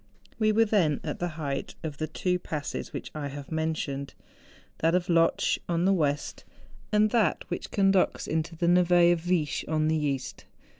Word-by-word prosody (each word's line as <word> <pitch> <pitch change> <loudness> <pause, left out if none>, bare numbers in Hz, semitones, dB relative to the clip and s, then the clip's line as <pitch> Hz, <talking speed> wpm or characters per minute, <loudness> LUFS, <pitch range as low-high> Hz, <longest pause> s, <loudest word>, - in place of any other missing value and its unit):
We 215 -1 +3
were 225 +1 +4
then 185 -9 +2
at 150 - -4
the 175 - -1
height 140 -3 -4
of 155 -3 -5
the 155 - -1
two 180 +3 -1
passes 150 -4 -5
which - - -6
I 150 -2 -4
have 140 +1 -8
mentioned, 155 -3 -3 0.6
that 165 +2 +2
of 180 +1 0
Lotsch 165 -1 +3
on 170 +1 +1
the 195 - +4
west, 145 -5 -1 0.5
and 210 0 +3
that 225 -4 +1
which 175 - -4
conducts 195 -2 +2
into 160 +1 -2
the 170 - -1
nhe 175 0 +5
of 170 - -3
Viesch 170 -4 0
on 155 0 +1
the 160 -1 +1
east. 135 -3 -3
165 Hz, 180 wpm, -27 LUFS, 150-180 Hz, 0.6 s, nhe